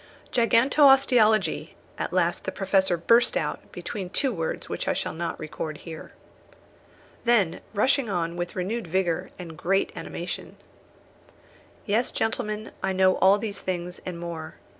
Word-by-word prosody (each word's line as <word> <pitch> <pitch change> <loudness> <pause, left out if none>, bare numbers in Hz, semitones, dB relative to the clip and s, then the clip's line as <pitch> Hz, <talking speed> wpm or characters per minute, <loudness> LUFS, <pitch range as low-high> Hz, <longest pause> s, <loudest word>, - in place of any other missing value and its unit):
"Gigantosteologie," 245 -2 +4 0.2
at - - -2
last - - 0
the - - -2
Professor 190 -2 +1
burst 230 +8 +4
out, - - -3
between 190 -3 -5
two 265 +6 0
words 165 -4 -3
which - - -4
I - - +2
shall - - -3
not 165 0 -4
record 155 0 -5
here. 160 0 -10 1.1
Then 225 -8 +2
rushing 255 +3 +2
on 170 -3 -1
with 175 0 -4
renewed 195 +3 -2
vigour, 175 -1 0
and 175 -3 -8
with 160 - -13
great 195 +3 +1
animation: - - -6 1.3
"Yes, 220 +3 +1
gentlemen, 215 -1 -2
I 190 0 0
know 185 0 +4
all 195 +2 +5
these 205 -1 -5
things, 180 -1 -4
and 180 -2 -6
more. 165 -2 -6
190 Hz, 140 wpm, -26 LUFS, 170-225 Hz, 1.3 s, all